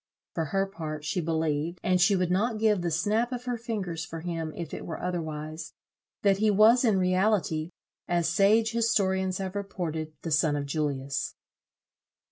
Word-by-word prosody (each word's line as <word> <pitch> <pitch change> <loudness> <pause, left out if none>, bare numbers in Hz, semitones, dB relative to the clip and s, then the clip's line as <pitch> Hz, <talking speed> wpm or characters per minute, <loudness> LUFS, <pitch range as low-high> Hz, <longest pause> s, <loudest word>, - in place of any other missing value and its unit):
For 165 - -1
her 195 +6 0
part, 155 -6 -6
she 180 - -1
believed, 160 +1 -1
and 185 -1 +2
she 200 +3 +5
would 180 -1 0
not 215 +5 +1
give 215 -3 +2
the 175 - -1
snap 210 +9 +1
of 250 -1 -5
her 245 -1 -1
fingers 205 -8 -4
for 160 0 -7
him 165 -2 -3
if 170 -3 -6
it - - -5
were 165 - -5
otherwise, 155 -2 -4 0.5
that 200 -2 +4
he 215 0 +3
was 215 +5 +6
in 220 -5 +3
reality, 185 -3 +1 0.4
as 175 -1 +1
sage 205 +6 +4
historians 190 -5 +1
have 190 -1 -4
reported, 160 -6 -4
the 165 - -3
son 150 -1 +3
of 145 -1 -2
Julius." 140 -2 -2
180 Hz, 170 wpm, -28 LUFS, 160-205 Hz, 0.5 s, was